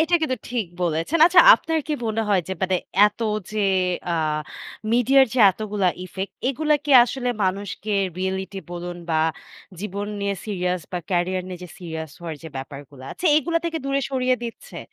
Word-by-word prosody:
এটা 335 +2 +2
কিন্তু 260 -5 0
ঠিক 240 -5 -1 0.2
বলেছেন। 165 - 0
আচ্ছা 355 +1 +7
আপনার 325 -1 -2
কি 305 - -2
মনে 220 +1 0
হয় 195 -3 +3
যে - - -2
মানে 190 0 +2 0.3
এত 210 - -5 0.3
যে 215 - -4 0.5
আ - - +1 0.8
মিডিয়ার 265 +3 +5
যে - - 0
এতগুলা 205 -1 -1 0.2
ইফেক্ট 190 +1 -6 0.2
এগুলা 300 +3 +1
কি 295 - -3
আসলে 250 +1 -3 0.2
মানুষকে 200 +2 -3 0.3
রিয়েলিটি 190 +1 -3
বলুন 175 0 -5
বা 160 - +2 0.6
জীবন 200 0 -4
নিয়ে 200 0 -1
সিরিয়াস 180 -3 -1
বা 180 - -1
ক্যারিয়ার 185 +1 0
নিয়ে 180 -1 -7
যে 180 - -11
সিরিয়াস 160 -3 -6
হওয়ার 165 -2 -6
যে 165 - -7
ব্যাপারগুলা 135 0 -9
আছে 365 - -3
এগুলো 330 +3 +1
থেকে 330 -1 -2
দূরে 275 0 0
সরিয়ে 255 -1 +1
দিচ্ছে? 235 -1 -8
200 Hz, 170 wpm, -23 LUFS, 180-255 Hz, 0.8 s, আচ্ছা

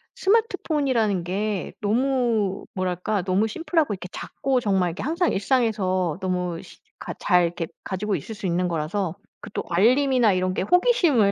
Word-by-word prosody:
스마트폰이라는 290 - +1
게 195 +2 -2
너무 230 -3 +1
뭐랄까. 185 +2 -1
너무 190 +4 +1
심플하고 320 +1 0
이렇게 185 -2 -7
작고 265 -1 -1
정말 190 -5 +1
이렇게 165 - -6
항상 335 +5 +1
일상에서 195 - +1
너무 180 -2 -2
실 - - -15 0.2
가 - - -5
잘 180 -3 +4
이렇게 170 0 -3 0.2
가지고 200 +2 -2
있을 220 - -6
수 205 - -7
있는 180 0 +1
거라서 170 +2 -2 0.3
그 - - -9
또 - - -2
알림이나 245 +3 +4
이런 185 0 0
게 - - -1
호기심을 335 - +3
205 Hz, 355 characters per minute, -24 LUFS, 185-255 Hz, 0.3 s, 잘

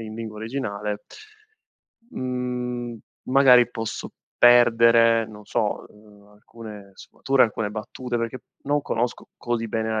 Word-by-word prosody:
in 110 -1 -7
lingua 110 -1 -7
originale 105 -3 -4 1.1
mhmm, 125 -1 -4 0.3
magari, 125 -2 +5
posso 115 -2 -5 0.3
perdere, 115 -1 +5
non 105 -1 -13
so, - - -2
uhm, 105 -1 -20
alcune 105 -1 -12
sfumature, 135 +6 0
alcune 110 -2 0
battute, 120 +3 -5
perché 115 +2 -3 0.2
non 145 +1 0
conosco 120 -2 -3
così 115 -2 -3
bene 110 0 -2
la 110 -1 -1
115 Hz, 120 wpm, -24 LUFS, 110-125 Hz, 1.1 s, magari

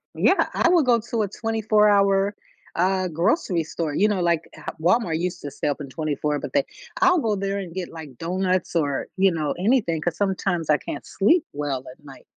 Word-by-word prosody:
Yeah, - - +3
I 340 - +3
will 345 -3 +5
go 240 -3 +3
to 230 0 -3
a 205 - -1
twenty-four-hour, 205 -2 +2 0.4
uh, 185 +1 +1
grocery 170 - +1
store, 155 -1 -4
you 205 - +3
know, 205 -4 0
like, 170 -2 0
uh, - - -6
Walmart 175 -2 +2
used 180 +1 -3
to 145 - -6
stay - - -3
open 145 -1 -3
24, 150 0 -2
but - - -7
they 280 -1 +2 0.4
I'll 365 -1 +5
go 220 -7 0
there 195 0 -2
and 185 -4 -6
get, 185 -1 -4
like, 155 -6 -10
donuts 185 +2 -1
or, 145 -4 0
you 190 0 +4
know, 155 -3 -1
anything 195 -7 +1
'cause 175 +1 -1
sometimes 190 -4 -1
I 150 - +5
can't 145 - -7
sleep 295 - +2
well 140 -3 -3
at 140 - -19
night. 135 -1 -13
185 Hz, 200 wpm, -23 LUFS, 160-210 Hz, 0.4 s, will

